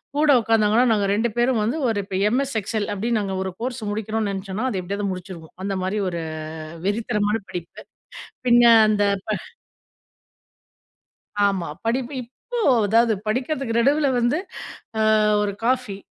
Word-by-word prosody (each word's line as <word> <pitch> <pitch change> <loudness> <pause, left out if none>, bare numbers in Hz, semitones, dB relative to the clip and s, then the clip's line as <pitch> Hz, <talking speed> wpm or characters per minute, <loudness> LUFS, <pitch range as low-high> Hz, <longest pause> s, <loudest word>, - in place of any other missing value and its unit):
கூட 300 0 +4
உட்காந்தாங்கன்னா, 225 +1 +3
நாங்க 205 -2 +2
2 225 +3 +1
பேரும் 240 -2 +2
வந்து, 235 +9 -1
ஒரு 220 -2 0
இப்போ 195 -1 -6
எம்எஸ் 270 +1 -1
எக்ஸெல், 215 +1 -2
அப்படின்னு 225 +3 0
நாங்க 195 -1 -3
ஒரு 190 - -4
கோர்ஸ் 250 -1 -3
முடிக்கணுனு 220 0 -2
நெனச்சோனா, 195 +5 -3
அது 190 - -2
எப்படியாவது 200 +2 -3
முடுச்சிருவோம். 180 -3 -8
அந்த 195 0 -2
மாரி, 200 +3 -1
ஒரு 170 -1 -4 0.7
வெறித்தனமான 210 0 0
படிப்பு. 175 -1 -7 0.7
பின்ன 240 0 +6 0.2
அந்த, 210 -1 +2 0.2
ப - - -8 2.2
ஆமா, 185 -4 -1 0.2
படிப்பு. 250 +3 -1
இப்போ 475 - -7 0.3
அதாவது 230 +1 +4
படிக்கிறதுக்கு 255 0 -1
நடுவுல 285 +4 +3
வந்து, 240 +6 +2 0.6
அ - - +2 0.4
ஒரு 200 - -2
காஃபி. 250 -6 0
220 Hz, 140 wpm, -23 LUFS, 200-240 Hz, 2.2 s, பின்ன